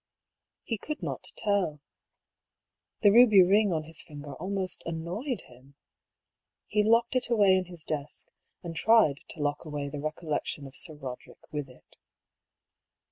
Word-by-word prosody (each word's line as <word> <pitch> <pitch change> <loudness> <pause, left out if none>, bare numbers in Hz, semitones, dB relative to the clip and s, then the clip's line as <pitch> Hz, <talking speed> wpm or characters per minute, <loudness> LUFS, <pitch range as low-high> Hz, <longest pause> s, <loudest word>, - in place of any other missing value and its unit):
He 225 -3 -3
could 305 +7 -6
not - - -4
tell. 200 -8 0 1.2
The 205 - +6
ruby 215 -4 +8
ring 200 +2 +4
on 160 -2 -1
his 160 +1 -1
finger 145 -1 -9
almost 185 +5 -2
annoyed 175 - -4
him. 130 +3 -19 0.9
He 210 - +1
locked 230 +3 +3
it 250 -2 +3
away 205 -5 +5
in 185 -1 0
his 175 -3 -4
desk, 150 -2 -4 0.3
and 170 -2 -6
tried 210 -9 +4
to 155 - -6
lock 145 0 -1
away 145 -3 -4
the 145 0 -6
recollection 155 -2 -3
of 135 - -11
Sir 160 -3 -1
Boderick 130 -4 -9
with 145 -2 -4
it. 125 - -19
170 Hz, 145 wpm, -28 LUFS, 150-205 Hz, 1.2 s, ruby